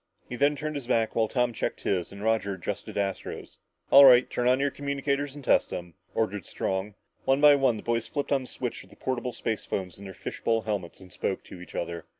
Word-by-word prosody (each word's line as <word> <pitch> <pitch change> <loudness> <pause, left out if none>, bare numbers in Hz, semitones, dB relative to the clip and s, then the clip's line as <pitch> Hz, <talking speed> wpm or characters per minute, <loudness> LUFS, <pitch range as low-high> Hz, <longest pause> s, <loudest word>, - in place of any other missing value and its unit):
He 125 - -5
then 145 +3 +3
turned 155 +2 -4
his 140 -5 -5
back 115 -3 +1
while 115 -1 +3
Tom 125 0 0
checked - - -3
his, 90 -3 -1
and 100 +1 -9
Roger 110 -3 +1
adjusted 95 +2 -5
Astro's. 100 -1 -4 0.3
"All 140 - +10
right, 125 -2 +8
turn 125 - -1
on 130 +1 +4
your 140 0 +1
communicators 140 0 -2
and 145 - -9
test - - +4
them," 85 -1 -6 0.2
ordered 105 -4 -1
Strong. 95 +2 -3 0.3
One 135 +1 +3
by 150 0 +8
one 135 -5 +3
the - - -9
boys 115 -1 -1
flipped 145 -1 -3
on 140 -2 +3
the 130 - -9
switch - - -5
of - - -19
the - - -16
portable 125 -1 -2
spacephones 100 -5 -3
in 100 - -10
their 95 -1 -8
fish - - -7
bowl 115 -1 +1
helmets 100 -5 -4
and 90 -1 -13
spoke 95 - -2
to 90 - -11
each 90 - -11
other. 85 -1 -4
115 Hz, 230 wpm, -27 LUFS, 100-135 Hz, 0.3 s, All